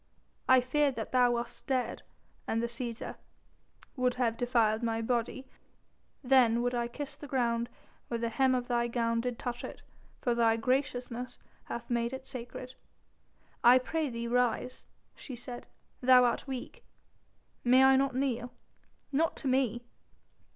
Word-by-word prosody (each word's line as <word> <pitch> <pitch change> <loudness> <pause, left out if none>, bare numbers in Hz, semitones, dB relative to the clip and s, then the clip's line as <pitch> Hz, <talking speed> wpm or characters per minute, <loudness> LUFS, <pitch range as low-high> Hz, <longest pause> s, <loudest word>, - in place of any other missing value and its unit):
"I 260 -1 +7
feared 275 +2 +1
that 225 - -5
thou 245 -1 +4
wast 235 0 -5
dead, 255 -3 -1 0.5
and 225 - 0
the 235 - 0
Cæsar...." 235 0 -5 0.8
"Would 255 -2 +1
have 240 -3 +1
defiled 230 -2 +2
my 225 -1 0
body. 240 +3 -1 0.8
Then 245 -3 +4
would 245 0 0
I 240 -1 0
kiss 285 +4 -6
the 290 0 -10
ground 235 -3 0 0.4
where 235 - -2
the 230 0 -1
hem 260 +2 +2
of 245 -1 -2
thy 240 -1 +1
gown 230 -1 0
did 245 -1 -3
touch 240 -1 -4
it, - - -8 0.4
for 240 - +1
thy 230 -1 +3
graciousness 250 0 -2 0.3
hath 235 - -6
made 235 +1 0
it 265 0 -6
sacred." 255 -1 -7 0.9
"I 245 +2 +8
pray 305 +4 -1
thee 235 -1 -4
rise," 250 +1 0 0.3
she 260 - -8
said, 245 0 -7 0.3
"thou 250 0 +7
art 240 - 0
weak." 260 -2 -6 0.8
"May 255 +2 +6
I 265 0 +7
not 270 -1 +1
kneel?" 250 -2 -1 0.6
"Not 320 +4 +1
to 275 - -5
me." 255 -3 +1
245 Hz, 150 wpm, -31 LUFS, 235-260 Hz, 0.9 s, I